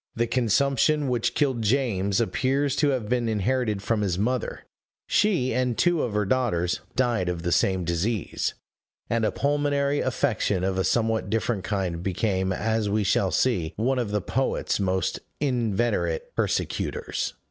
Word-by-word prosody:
The 120 - +1
consumption 140 +5 +2
which 120 -2 0
killed 135 -5 +1
James 105 -5 +1
appears 135 +4 +1
to 145 - +3
have 125 -6 -1
been 120 0 0
inherited 110 -1 0
from 110 0 0
his 95 -4 0
mother; 120 +5 -1 0.4
she, 175 - +2
and 125 -1 0
two 175 -3 +3
of 110 -4 -2
her 105 0 +1
daughters, 95 -7 0 0.2
died 120 -7 +1
of 85 -2 -3
the 85 - -1
same 95 +1 +2
disease; 85 +5 -1 0.6
and 115 -1 +1
a 110 - +2
pulmonary 145 0 +1
affection 115 -7 0
of 95 0 0
a - - +2
somewhat 110 0 +1
different 110 -3 -1
kind 95 -5 -2
became, 95 0 0
as 110 +2 0
we 105 +1 +1
shall 95 0 +2
see, 90 -8 +1
one 125 +4 0
of 120 -4 -1
the 105 0 0
poet's 130 +2 -1
most 95 -1 0 0.2
inveterate 125 - 0
persecutors. 460 -3 -2
115 Hz, 155 wpm, -25 LUFS, 100-130 Hz, 0.6 s, to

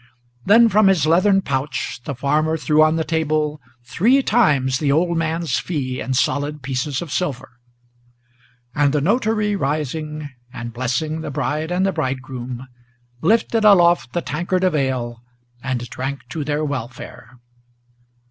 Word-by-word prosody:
Then 230 +4 +6
from 210 -1 +4
his 185 -6 +3
leathern 185 +4 +3
pouch 135 -3 -3
the 140 - -4
farmer 150 +5 +1
threw 155 0 +2
on 155 +1 +4
the 160 - 0
table 155 -2 -1 0.2
Three 215 - +2
times 140 - +2
the 145 -3 +1
old 170 +4 +2
man's 165 0 -1
fee 130 -7 -3
in 130 - -2
solid 145 +2 -1
pieces 135 +3 -2
of 160 - -10
silver; 135 -8 -3 1.1
And 145 0 +2
the 150 - +2
notary 215 - +1
rising, 150 -1 -3 0.2
and 120 -2 -7
blessing 130 +6 -2
the - - -5
bride 150 +3 -2
and 180 +2 +1
the 195 - +2
bridegroom, 130 -3 -4 0.5
Lifted 225 0 +2
aloft 175 -10 +5
the 175 - -1
tankard 180 +4 -1
of 185 -2 +2
ale 125 -5 -2 0.4
and 125 -2 -3
drank 135 +4 -5
to 155 - -4
their 150 +1 -1
welfare. 125 -2 -7
150 Hz, 145 wpm, -20 LUFS, 130-170 Hz, 1.1 s, Then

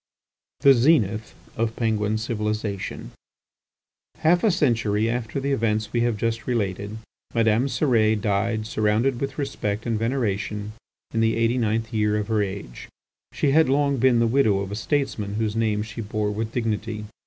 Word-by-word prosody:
THE 140 -1 +8
ZENITH 115 - +2 0.2
OF 115 0 -1
PENGUIN 110 -2 0
CIVILIZATION 105 - -3 1.1
Half 175 +2 +3
a 220 - +5
century 115 - +1
after 115 +1 -2
the 140 +1 -2
events 110 -4 0
we 120 - +2
have 120 -2 +1
just 115 +1 -2
related, 105 -3 -2 0.4
Madame 115 +2 +3
Cérès 110 -7 +2
died 110 +2 0
surrounded 110 +4 +1
with 135 -1 -3
respect 110 -7 -3
and 115 -3 -1
veneration, 105 -3 -2 0.4
in 115 - 0
the 115 0 +2
eighty 115 +2 +1
ninth 110 0 -1
year 105 -1 +1
of 105 +1 -3
her 110 -1 +2
age. 95 -10 -6 0.4
She 140 - +1
had 155 -1 +4
long 140 0 +2
been 125 0 +4
the 115 - +3
widow 115 -5 +2
of 100 0 -5
a - - -3
statesman 110 -5 -2
whose 110 -1 -1
name 110 -2 +1
she 110 +2 -7
bore 105 -1 -2
with 110 +2 -3
dignity. 110 -2 -2
110 Hz, 160 wpm, -24 LUFS, 105-120 Hz, 1.1 s, THE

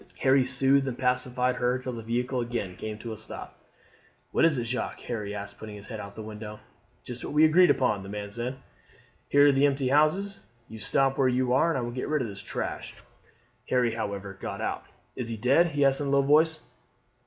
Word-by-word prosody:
Harry 135 0 +5
soothed 135 +2 +2
and 125 -2 -3
pacified 125 0 0
her 125 +1 +1
till 130 0 -5
the 115 - -6
vehicle 125 +3 -1
again 115 -6 -3
came 110 +2 -6
to 115 +1 -6
a - - -8
stop. 110 - -9 0.7
"What - - +3
is 160 -4 +4
it, 120 - -1
Jacques?" 125 +2 -3
Harry 105 -4 -4
asked, 100 0 -7
putting 110 -1 -8
his 100 0 -10
head 110 -3 -7
out 100 - -6
of 100 - -15
the 110 - -7
window. 105 0 -8 0.4
"Just 125 -1 -8
what - - -5
we 155 +1 +7
agreed 175 +3 +6
upon," 115 -6 +2
the 95 - -9
man 105 0 -5
said. 120 +4 -4 0.7
"Here 145 0 +6
are - - +6
the 140 +1 +4
empty 135 -2 0
houses. 185 +8 +2 0.3
You 110 0 -10
stop 135 +5 +1
where 135 - +4
you 125 0 +1
are. 160 +4 +3
I - - -1
will 120 0 -3
get 125 +1 -4
rid 150 -3 +1
of - - -3
this 100 -2 -8
trash." - - -5 0.7
Harry, 125 -3 +2
however, 100 -3 -5
got - - -5
out. - - -3 0.3
"Is 125 - -4
he 115 - -4
dead?" 135 +10 +4
he 145 -3 +1
asked 135 +1 +3
in 145 - -1
a - - -1
low 140 0 +4
voice. 155 +3 +3
125 Hz, 220 wpm, -27 LUFS, 110-140 Hz, 0.7 s, we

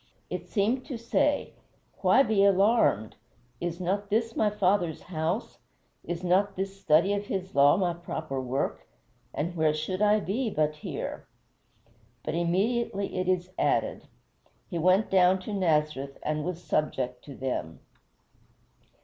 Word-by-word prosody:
It - - -4
seemed 230 +5 0
to 260 - -4
say, 285 +5 0 0.5
"Why 270 - +5
be 215 -6 +2
alarmed? 200 - +3 0.4
is 175 0 -3
not 200 +3 -1
this 225 +2 0
my 215 - +3
Father's 190 -5 0
house; 170 +5 -3 0.4
is 175 +1 -5
not 195 +3 +2
this 195 +1 -4
study 170 +6 +4
of 205 0 -3
his 190 -1 -4
law 140 +3 +5
my 180 -3 +1
proper 160 -5 -5
work; 130 +2 -3 0.4
and 170 +4 -3
where 155 -2 +2
should 185 +5 -3
I 210 0 +4
be 225 +5 -1
but 155 -4 0
here?" - - -6 1.0
But - - -3
immediately 195 +5 0
it 185 - -1
is 185 0 0
added, - - 0 0.6
"He 170 - -2
went 185 +5 +3
down 185 0 +5
to 210 - -6
Nazareth 150 -7 0
and 155 0 -1
was 175 +1 -4
subject 125 -5 -1
to 140 - -9
them." 125 -12 -4
185 Hz, 140 wpm, -28 LUFS, 155-205 Hz, 1.0 s, Why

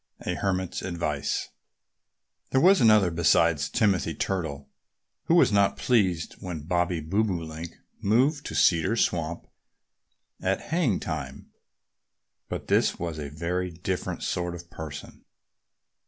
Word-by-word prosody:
XX - - -1
A - - -2
HERMIT'S 95 -2 -1
ADVICE 75 -6 -2 1.0
THERE 130 - +3
was 190 0 +6
another, 110 -6 +5
besides 80 -2 +3
Timothy 100 - +1
Turtle, 80 -8 -3 0.6
who 165 - +3
was 170 - +5
not 100 -1 +3
pleased 95 -9 +1
when 90 -4 -5
Bobby 85 0 0
Bobolink 85 -3 -2 0.2
moved 130 +8 +2
to - - -6
Cedar 90 +5 +3
Swamp 85 -6 -1 1.0
at - - 0
haying 155 - 0
time. - - -6 1.0
But - - -5
this - - +2
was 85 -2 -4
a 75 -1 -5
very 85 +4 -2
different 90 +2 -4
sort 90 0 -2
of 85 0 -11
person. 75 -3 -8
90 Hz, 125 wpm, -26 LUFS, 80-100 Hz, 1.0 s, was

